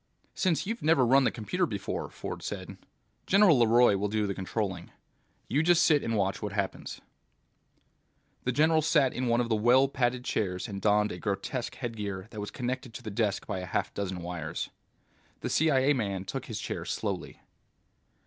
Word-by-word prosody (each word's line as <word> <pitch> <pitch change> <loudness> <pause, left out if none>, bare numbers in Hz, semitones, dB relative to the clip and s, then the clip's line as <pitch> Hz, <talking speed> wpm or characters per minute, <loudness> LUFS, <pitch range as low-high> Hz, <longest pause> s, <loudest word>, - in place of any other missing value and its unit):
"Since 185 -2 +1
you've 225 +4 -3
never 155 -4 +4
run 135 +2 +5
the - - +4
computer 180 - -1
before," 100 -7 -4
Ford - - -6
said, - - -6 0.5
"General 190 -8 +6
LeRoy 115 -1 +5
will 100 +2 0
do 105 0 0
the 100 - -1
controlling. 95 -2 -3 0.6
You 140 +5 +2
just 175 +1 +4
sit 150 -3 +4
and 115 -1 -1
watch 95 -1 0
what 105 -2 -4
happens." 100 -2 -3 1.4
The 125 - 0
general 155 +4 +3
sat 150 -4 +3
in 125 0 -2
one 120 0 +3
of 120 - -2
the 110 - +3
well 125 +5 +5
padded 125 -2 -1
chairs 90 0 -1
and 100 -2 -6
donned 105 0 +3
a 90 - -6
grotesque 115 +5 -3
headgear 105 -6 -4
that 110 - -7
was 105 - -4
connected 125 -2 -4
to - - -8
the 110 - -5
desk 105 -1 0
by 100 -3 -3
a 90 - -6
half - - -2
dozen 95 -3 -4
wires. 85 -2 -4 0.7
The - - -3
CIA 145 -3 +3
man 100 -7 -2
took - - -5
his - - -4
chair - - -4
slowly. - - -4
115 Hz, 180 wpm, -29 LUFS, 100-135 Hz, 1.4 s, General